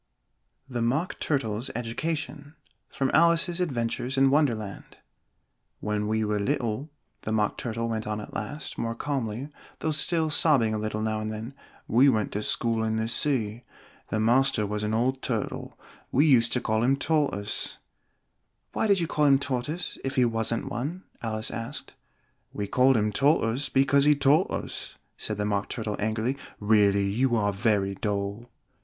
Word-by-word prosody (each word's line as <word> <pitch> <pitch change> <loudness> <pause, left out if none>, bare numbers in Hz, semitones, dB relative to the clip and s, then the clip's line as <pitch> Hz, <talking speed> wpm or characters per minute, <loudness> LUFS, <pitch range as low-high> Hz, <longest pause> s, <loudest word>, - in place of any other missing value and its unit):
THE 120 -3 -3
MOCK 135 +10 0
TURTLE'S 125 -4 -1
EDUCATION 145 +5 -4 0.3
From 135 -1 -1
'Alice's 170 +2 +4
Adventures 125 -3 -1
in 135 0 +5
Wonderland' 115 -9 -1 0.8
"When 105 0 -1
we 110 0 +1
were 105 0 0
little," 130 +3 -1 0.3
the 110 - -4
Mock 105 -1 +1
Turtle 115 -2 -3
went 110 -2 -3
on 105 0 -2
at 105 - -9
last, 140 +7 -5
more 115 0 -2
calmly, 130 -1 -3 0.3
though 160 - -1
still 160 +1 +1
sobbing 135 -8 +3
a 110 - -1
little 110 0 -2
now 110 0 -1
and 110 0 -3
then, 110 +4 -6 0.3
"we 130 +5 +5
went 110 -5 +1
to 105 - -2
school 115 +1 0
in 110 0 0
the 110 0 -1
sea. 115 -3 -1 0.5
The 110 - -1
master 120 0 +3
was 105 +1 -2
an 105 +1 -1
old 130 +3 0
Turtle 115 -5 -3 0.3
we 140 +5 +4
used 120 -6 +4
to 125 - +1
call 110 0 0
him 135 +3 +3
Tortoise 140 -10 0 0.5
" - - -49
"Why - - +1
did 200 -2 +4
you 170 - 0
call 150 -2 +1
him 140 -1 +6
Tortoise, 140 +5 -3
if 135 - -3
he 125 - +4
wasn't 115 0 0
one?" 155 +10 -4 0.2
Alice 110 -1 -3
asked. 115 0 -6 0.6
"We 105 - -3
called 130 +5 +4
him 105 0 +1
Tortoise 135 +1 +2
because 135 +1 +3
he 150 0 +6
taught 145 +5 +3
us," - - -5 0.2
said 105 - -4
the 105 - -1
Mock 100 -1 -1
Turtle 110 -3 -3
angrily; 110 +5 -1 0.2
"really 100 -2 +3
you 120 +5 +1
are 105 -2 +1
very 100 -2 +1
dull!" 100 +3 -3
115 Hz, 165 wpm, -27 LUFS, 110-140 Hz, 0.8 s, him